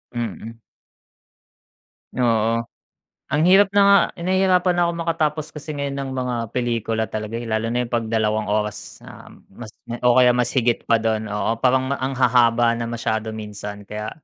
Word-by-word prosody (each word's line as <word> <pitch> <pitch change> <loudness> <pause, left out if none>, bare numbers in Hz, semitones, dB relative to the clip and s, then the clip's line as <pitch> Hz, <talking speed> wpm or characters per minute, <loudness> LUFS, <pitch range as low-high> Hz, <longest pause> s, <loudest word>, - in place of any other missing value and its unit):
Mm. 115 0 -5 1.6
Oo. 115 -1 +1 0.7
Ang 150 +2 +1
hirap 195 +1 +6
na 205 - +4
nga 200 0 +7 0.2
nahihirapan 185 0 +2
na 175 - +2
ako 170 - -1
makatapos 155 -2 -1
kasi 150 0 -8
ngayon 140 -1 -3
ng 135 -1 -4
mga 125 -1 -2 0.2
pelikula 115 -2 -1
talaga, 110 +1 -5
eh, 120 - -7
lalo 110 +1 -1
na 125 - 0
yung - - -16
'pag 115 -2 -1
2 110 -1 0
oras 105 0 -3
na - - -13 0.2
mas 110 +2 -11 0.3
o 125 -1 +5
kaya 125 -1 +5
mas 120 -1 +1
higit 120 -3 +1
pa 115 -1 +3
dun, 110 -1 -1
oo. 105 +2 -1
Parang 130 0 +2
ma 140 - -1
ang 130 +1 -2
hahaba 120 -2 +3
na 115 - -3
masyado 110 -2 -2
minsan 105 -1 -7
kaya 105 0 -5
120 Hz, 170 wpm, -21 LUFS, 110-135 Hz, 1.6 s, nga